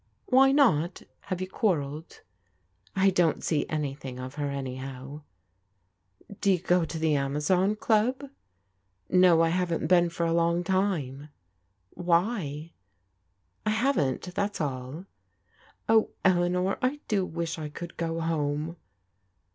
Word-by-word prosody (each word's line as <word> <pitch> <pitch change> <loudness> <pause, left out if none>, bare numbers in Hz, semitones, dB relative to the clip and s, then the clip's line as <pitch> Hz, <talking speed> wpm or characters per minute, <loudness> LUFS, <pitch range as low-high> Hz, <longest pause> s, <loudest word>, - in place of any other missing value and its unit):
" - - -45
Why 270 +1 +5
not? 185 - +2 0.2
Have 185 -2 -3
you 185 - -2
quarrelled? 160 -7 -2 0.2
" 90 -1 -44
" 95 +1 -35
I 195 - +6
don't 175 -3 +1
see 150 -3 0
anything 140 -4 -4
of 130 +1 -6
her, 145 -1 -3
anyhow/' 135 +1 -6 1.1
•* - - -19
Do 200 - +3
you 185 - +3
go 180 -1 +2
to 165 - -5
the 160 -1 +1
Amazon 150 +9 +1
Qub? 245 +6 0 0.3
" 95 0 -46
*' 95 0 -45
No, 180 -3 +6
I 165 - +3
haven't 170 -2 0
been 175 +1 +4
for 170 0 -2
a 165 - +1
long 170 +1 +2
time." 165 -8 -1 0.6
"Why?" 170 -3 -1 0.5
" 90 -1 -45
I - - +4
haven't, 215 - 0
that's 200 +1 -2
all." 140 +3 -4 0.4
" 90 - -32
Oh, 220 -1 +4 0.2
Eleanor, 180 +1 +2
I 260 +4 0
do 200 -3 +1
wish 170 -2 -4
I 155 -1 -5
could 170 +3 -8
go 165 0 -2
home." 155 0 -2
165 Hz, 150 wpm, -27 LUFS, 140-185 Hz, 1.1 s, I